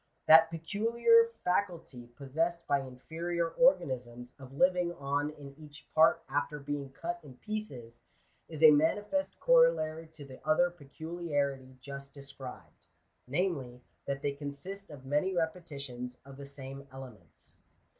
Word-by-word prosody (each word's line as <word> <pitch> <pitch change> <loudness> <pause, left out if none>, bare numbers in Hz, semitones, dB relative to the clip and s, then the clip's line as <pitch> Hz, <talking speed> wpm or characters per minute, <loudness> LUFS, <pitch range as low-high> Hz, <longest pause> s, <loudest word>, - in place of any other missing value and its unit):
That 160 +1 +8
peculiar 230 +7 +3
faculty 170 -9 -2
possessed 160 +7 -2
by 140 - +2
inferior 165 +7 -3
organisms 130 - +1
of 130 -1 -11
living 180 0 +3
on 145 0 -1
in 145 -2 -11
each 150 0 -13
part 160 +1 +5
after 145 +2 -2
being 140 -1 -4
cut 170 +5 -5
in 140 -4 -13
pieces, 125 - -6 0.5
is 160 -1 -4
a 155 - +11
manifest 205 - +1
corollary - - +3
to 150 -2 -10
the 130 -1 -13
other 175 +3 +3
peculiarity 145 -4 -4
just 140 +1 -9
described; 135 -2 -11 0.4
namely, 135 -5 -2 0.2
that 140 0 -3
they 145 - +1
consist 145 +8 -7
of 140 -4 -11
many 150 +8 0
repetitions 140 -7 -4
of 135 -1 -12
the 140 -1 -9
same 140 0 -9
elements. 130 -5 -12
145 Hz, 130 wpm, -31 LUFS, 135-175 Hz, 0.5 s, a